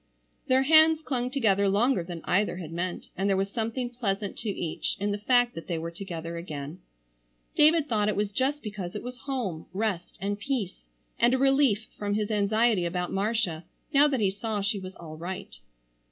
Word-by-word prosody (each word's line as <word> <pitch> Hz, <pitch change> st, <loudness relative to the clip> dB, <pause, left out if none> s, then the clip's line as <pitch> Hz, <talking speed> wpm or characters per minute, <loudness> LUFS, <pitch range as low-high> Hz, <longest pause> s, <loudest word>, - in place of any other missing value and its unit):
Their 260 Hz, +1 st, +4 dB
hands 315 Hz, +2 st, +6 dB
clung 250 Hz, -4 st, -1 dB
together 200 Hz, -7 st, +2 dB
longer 210 Hz, 0 st, +2 dB
than 170 Hz, -1 st, -7 dB
either 200 Hz, 0 st, +1 dB
had 165 Hz, -4 st, -7 dB
meant, 175 Hz, +2 st, -4 dB
and 195 Hz, +2 st, 0 dB
there 195 Hz, -, +3 dB
was 195 Hz, +1 st, -1 dB
something 235 Hz, +2 st, -2 dB
pleasant 205 Hz, -4 st, -2 dB
to 220 Hz, -, -3 dB
each 175 Hz, -2 st, -2 dB
in 205 Hz, +1 st, 0 dB
the 205 Hz, -, -2 dB
fact 245 Hz, +2 st, +3 dB
that 165 Hz, -, -8 dB
they 170 Hz, -, -1 dB
were 165 Hz, +1 st, -4 dB
together 170 Hz, -2 st, -6 dB
again. 155 Hz, -1 st, -6 dB, 0.8 s
David 305 Hz, 0 st, +5 dB
thought 210 Hz, -4 st, +1 dB
it 210 Hz, -, 0 dB
was 205 Hz, 0 st, 0 dB
just 275 Hz, +6 st, 0 dB
because 200 Hz, -5 st, -5 dB
it 210 Hz, -, -4 dB
was 250 Hz, +1 st, -7 dB
home, 210 Hz, -12 st, -3 dB
rest, 195 Hz, -3 st, -2 dB
and 200 Hz, +2 st, -2 dB
peace, 215 Hz, -5 st, -3 dB, 0.3 s
and 240 Hz, +2 st, +5 dB
a -, -, +2 dB
relief 270 Hz, -5 st, +3 dB
from 205 Hz, 0 st, -1 dB
his 210 Hz, 0 st, -1 dB
anxiety 210 Hz, -2 st, +2 dB
about 180 Hz, +1 st, -2 dB
Marcia 195 Hz, -5 st, 0 dB, 0.3 s
now 285 Hz, +1 st, +7 dB
that 270 Hz, -4 st, 0 dB
he 195 Hz, -2 st, +3 dB
saw 210 Hz, +1 st, -3 dB
she 200 Hz, +1 st, 0 dB
was 185 Hz, 0 st, -8 dB
all 155 Hz, -2 st, -9 dB
right. 170 Hz, -, -6 dB
205 Hz, 195 wpm, -28 LUFS, 185-245 Hz, 0.8 s, now